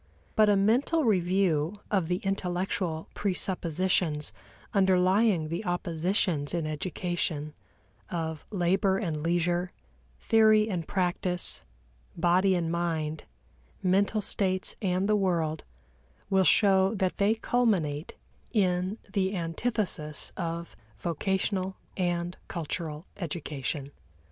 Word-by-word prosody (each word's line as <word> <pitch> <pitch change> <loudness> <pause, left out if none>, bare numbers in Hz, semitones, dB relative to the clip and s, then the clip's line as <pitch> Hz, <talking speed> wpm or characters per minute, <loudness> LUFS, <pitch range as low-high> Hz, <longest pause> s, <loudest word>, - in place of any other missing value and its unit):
But 215 -1 +5
a 205 - +5
mental 245 +11 +3
review 185 - +2
of 190 -6 +2
the 180 - +1
intellectual 180 -3 -2
presuppositions 180 -4 0 0.4
underlying 190 -2 +3
the 170 +6 -3
oppositions 175 -3 0
in 165 -2 -1
education 155 -1 -2 0.6
of 160 -3 -3
labor 190 0 +2
and 165 -8 -2
leisure, 175 +2 0 0.5
theory 215 -1 +5
and 175 -6 -3
practice, 180 -1 -1 0.6
body 185 +2 +3
and 165 -2 -1
mind, 160 -3 -2 0.6
mental 200 +3 +2
states 185 -2 0
and 185 -1 +1
the 210 - +3
world, 170 -6 0 0.7
will 190 -1 +4
show 195 0 +4
that 190 -2 0
they 205 +2 +3
culminate 195 -11 0 0.4
in 185 -2 +1 0.2
the 195 -1 +1
antithesis 165 - -1
of 170 -1 -4 0.2
vocational 190 - -1 0.2
and 175 -1 -1
cultural 160 -1 -4
education. 150 -5 -4
180 Hz, 100 wpm, -28 LUFS, 165-195 Hz, 0.7 s, But